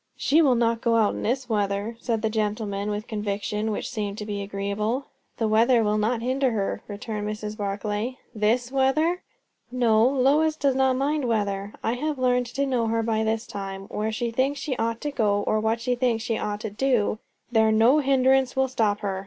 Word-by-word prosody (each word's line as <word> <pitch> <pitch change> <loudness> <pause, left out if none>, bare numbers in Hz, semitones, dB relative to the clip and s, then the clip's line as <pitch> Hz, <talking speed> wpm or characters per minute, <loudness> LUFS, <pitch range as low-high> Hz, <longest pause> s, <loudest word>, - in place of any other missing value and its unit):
"She 315 +4 +3
will 270 -5 +4
not 230 -1 +1
go 235 -2 +2
out 220 -2 +3
in - - -5
this 255 +3 -1
weather," 205 0 -1
said 230 -2 -2
the 220 - +2
gentleman, 210 -2 -2
with 210 +1 -3
conviction 210 0 -2
which 210 - -3
seemed 210 -4 -4
to 210 - -5
be 205 -1 -4
agreeable. 200 +6 -2 0.3
"The 225 - 0
weather 230 +2 +4
will 210 0 +1
not 230 +2 0
hinder 260 +2 +1
her," 200 -3 -2
returned 210 0 -5
Mrs. 210 0 -4
Barclay. 210 +4 -3 0.2
"This 235 +3 +1
weather?" 305 +7 +2 0.5
"No. 230 -3 +3
Lois 280 +4 +3
does 280 -3 +1
not 265 0 +2
mind 285 +2 0
weather. 205 -3 -1
I 225 - +1
have 295 +4 -2
learned 250 -1 +1
to 275 +4 -1
know 250 -4 0
her 225 0 0
by 220 -1 0
this 220 +1 -1
time. 195 -2 -6
Where 215 +1 -2
she 235 +1 -2
thinks 270 +4 0
she 280 -2 -2
ought 230 0 -1
to 295 - -2
go, 205 -6 +1
or 215 - +1
what 220 +1 0
she 250 +2 0
thinks 240 -2 0
she 225 - -1
ought 210 0 -3
to 220 - -4
do, 220 -2 +1 0.3
there 220 -2 +4
no 230 +7 +5
hindrance 265 -2 +3
will 265 0 +2
stop 215 -5 0
her. 195 -2 -2
225 Hz, 200 wpm, -25 LUFS, 210-255 Hz, 0.5 s, no